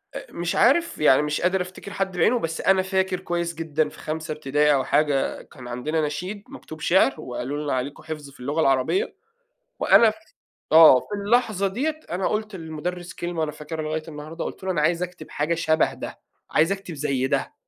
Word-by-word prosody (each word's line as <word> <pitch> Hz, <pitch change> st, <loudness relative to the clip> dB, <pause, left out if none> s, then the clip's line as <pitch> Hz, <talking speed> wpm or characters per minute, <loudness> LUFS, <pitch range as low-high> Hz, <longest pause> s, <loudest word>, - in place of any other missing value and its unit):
أ -, -, -8 dB
مش 170 Hz, 0 st, -3 dB
عارف، 330 Hz, +8 st, +3 dB
يعني 150 Hz, -2 st, +5 dB
مش 150 Hz, 0 st, -1 dB
قادر 180 Hz, +2 st, +2 dB
افتكر 185 Hz, +2 st, -8 dB
حد 190 Hz, -2 st, -2 dB
بِعِينه، 240 Hz, +5 st, +3 dB
بس 165 Hz, -3 st, -3 dB
أنا 190 Hz, -1 st, +4 dB
فاكر 190 Hz, -1 st, 0 dB
كويس 170 Hz, -1 st, -2 dB
جدًا 155 Hz, -1 st, -1 dB
في -, -, -15 dB
خمسة 155 Hz, 0 st, -4 dB
ابتدائي 150 Hz, 0 st, +2 dB
أو 135 Hz, -, +2 dB
حاجة، 145 Hz, -1 st, +1 dB
كان 125 Hz, -1 st, -13 dB
عندنا 150 Hz, +7 st, -2 dB
نشيد 180 Hz, +8 st, -5 dB
مكتوب 245 Hz, -, -10 dB
شعر، 170 Hz, -4 st, +4 dB
وقالوا 130 Hz, +4 st, -4 dB
لنا: 145 Hz, -, -1 dB
"عليكم 130 Hz, +3 st, -3 dB
حِفظ 150 Hz, -3 st, -7 dB
في 140 Hz, -, -18 dB
اللغة 145 Hz, +6 st, -1 dB
العربية." 135 Hz, -, +1 dB, 0.6 s
وأنا 230 Hz, -2 st, +6 dB
ف -, -, -6 dB, 0.6 s
آه، 160 Hz, -5 st, +9 dB
في -, -, -14 dB, 0.2 s
اللحظة 215 Hz, -3 st, +2 dB
ديّة، 295 Hz, +10 st, -2 dB
أنا 180 Hz, +2 st, -1 dB
قُلت 215 Hz, -1 st, -2 dB
للمدرس 175 Hz, +2 st, -5 dB
كلمة، 175 Hz, -1 st, -4 dB
وأنا 155 Hz, -1 st, 0 dB
فاكرها 155 Hz, +1 st, -6 dB
لغاية 155 Hz, +1 st, -3 dB
النهاردة، 155 Hz, +2 st, -7 dB
قُلت -, -, -7 dB
له: 190 Hz, -, -1 dB
"أنا 150 Hz, -, 0 dB
عايز 170 Hz, +3 st, +2 dB
اكتب 175 Hz, -3 st, -8 dB
حاجة 150 Hz, +3 st, -1 dB
شبه 160 Hz, -1 st, +2 dB
ده. -, -, -8 dB, 0.3 s
عايز 165 Hz, +5 st, +3 dB
اكتب 195 Hz, -3 st, -4 dB
زي 135 Hz, -2 st, -1 dB
ده." -, -, -1 dB
160 Hz, 195 wpm, -24 LUFS, 150-190 Hz, 0.6 s, آه